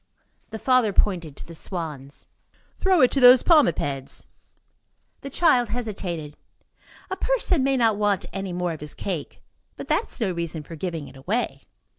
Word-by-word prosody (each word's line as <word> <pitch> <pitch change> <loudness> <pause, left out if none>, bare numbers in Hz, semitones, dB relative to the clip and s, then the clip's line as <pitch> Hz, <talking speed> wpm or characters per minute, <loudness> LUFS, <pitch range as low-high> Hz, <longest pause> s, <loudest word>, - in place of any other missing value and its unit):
The 220 - -6
father 250 -3 +2
pointed 170 -9 0
to - - -9
the 170 - -10
swans. 155 -5 -6 0.5
"Throw 375 -4 +3
it 255 - +5
to 275 - +1
those 250 0 +8
palmipeds." 145 - +2 0.9
The 275 - -7
child 255 -6 +3
hesitated. 190 -10 -4 0.7
A - - 0
person 380 - +1
may 270 0 +2
not 225 -4 +3
want 205 -2 +1
any 195 -1 -4
more 175 0 -2
of 155 - -10
his 150 - -5
cake; 175 -7 -5 0.3
but - - -8
that - - +1
is - - -6
no 210 -5 0
reason 170 -2 -4
for 165 - -10
giving 165 -2 -4
it - - -14
away. 140 - -3
195 Hz, 165 wpm, -24 LUFS, 160-245 Hz, 0.9 s, those